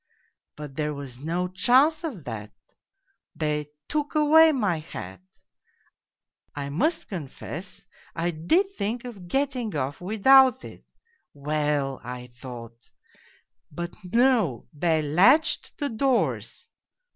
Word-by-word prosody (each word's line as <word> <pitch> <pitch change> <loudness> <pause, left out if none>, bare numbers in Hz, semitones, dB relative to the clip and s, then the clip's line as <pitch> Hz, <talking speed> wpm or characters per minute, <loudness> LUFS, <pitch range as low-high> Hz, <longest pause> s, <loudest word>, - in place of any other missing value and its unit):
But 150 -2 -9
there 150 -1 -1
was 135 -2 -8
no 175 +3 -1
chance 255 - +3
of 250 - -5
that, 110 -5 -7 0.8
they 150 -1 -1 0.2
took 300 0 -2
away 315 +2 +6
my 205 - 0
hat... 95 - -9 1.3
I 140 -1 -4
must 250 - 0
confess, 175 - -7 0.3
I 170 +1 0
did 340 - +1
think 230 - -3
of 200 -8 -9
getting 255 - -1
off 140 +2 -3
with 200 +3 -5
out 265 -2 +7
it. - - -12 0.3
' - - -51
Well! 145 -2 -1
' - - -25
I 125 0 -8
thought 120 -2 -11 0.8
but 170 +3 -6
no, 220 - +2
they 160 +1 +1
latched 200 - +3
the 290 -3 -2
doors. 255 +2 -1
175 Hz, 120 wpm, -25 LUFS, -, 1.3 s, out